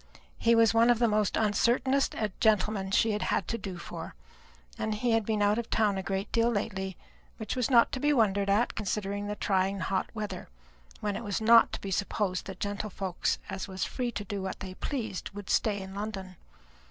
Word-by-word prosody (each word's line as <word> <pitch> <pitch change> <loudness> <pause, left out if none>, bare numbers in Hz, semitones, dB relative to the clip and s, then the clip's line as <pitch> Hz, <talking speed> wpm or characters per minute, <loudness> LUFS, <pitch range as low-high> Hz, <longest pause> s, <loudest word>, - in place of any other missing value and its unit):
He 230 0 +4
was 230 -2 +5
one 230 +1 +5
of 240 - +5
the 235 +1 +3
most 210 -2 +1
uncertingest 235 +1 +1
gentlemen 210 -2 +2
she 220 +3 +3
had 210 0 -1
to - - -1
do 190 -2 -6
for; 170 - -8 0.6
and 220 -1 -1
he 240 +3 0
had 225 -2 +2
been 215 -2 +1
out 205 +2 +3
of 235 - -5
town 210 -3 +2
a 190 - -2
great 195 +1 -3
deal 230 0 +3
lately; 190 -4 -3 0.4
which 220 -3 -4
was 250 -1 0
not 235 -3 +5
to 260 - -3
be 295 +2 +2
wondered 200 -6 +2
at, 210 +5 +2
considering 205 0 -3
the 210 - -3
trying 195 -1 +1
hot 190 0 -1
weather, 210 -2 -5 0.5
when 205 -1 -1
it - - -5
was 205 -3 -2
not 230 +1 +6
to - - -4
be 195 - -5
supposed 190 -1 -1
that 195 -2 -8
gentlefolks 200 -2 -2
as 190 0 -5
was 190 -1 -4
free 250 -2 -3
to 205 - -3
do 200 0 -4
what 190 0 -4
they 185 -1 -6
pleased 220 - -4
would 205 -1 -5
stay 205 -2 +2
in 190 0 -8
London. 195 -2 -5
210 Hz, 200 wpm, -29 LUFS, 195-225 Hz, 0.6 s, not